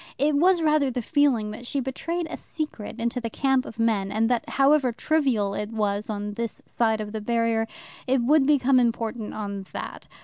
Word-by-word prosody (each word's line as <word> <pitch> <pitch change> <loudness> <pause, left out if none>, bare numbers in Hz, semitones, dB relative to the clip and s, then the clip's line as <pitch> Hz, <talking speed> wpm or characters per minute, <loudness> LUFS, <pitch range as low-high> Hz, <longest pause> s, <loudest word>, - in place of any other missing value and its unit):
It 290 +3 +2
was 345 +3 +4
rather 305 -3 +3
the 250 -1 -3
feeling 260 -7 +2
that 240 +3 -8
she 280 - -1
betrayed 330 +7 -3
a - - -3
secret 250 -8 -6
into 235 +2 -1
the 230 - -3
camp 265 +2 +1
of 225 - -10
men, 215 -4 +1
and 220 +2 +1
that, 240 - 0
however 275 -2 +3
trivial 245 -7 +1
it 210 +1 -3
was 210 -1 -1
on 205 -1 -3
this 230 0 -4
side 220 -2 +1
of 210 -1 -5
the 220 0 -4
barrier, 230 0 +1 0.4
it 260 +1 +3
would 280 +2 +4
become 275 -3 +4
important 230 -2 -1
on 200 -2 -5
that. - - -7
235 Hz, 195 wpm, -25 LUFS, 215-275 Hz, 0.4 s, was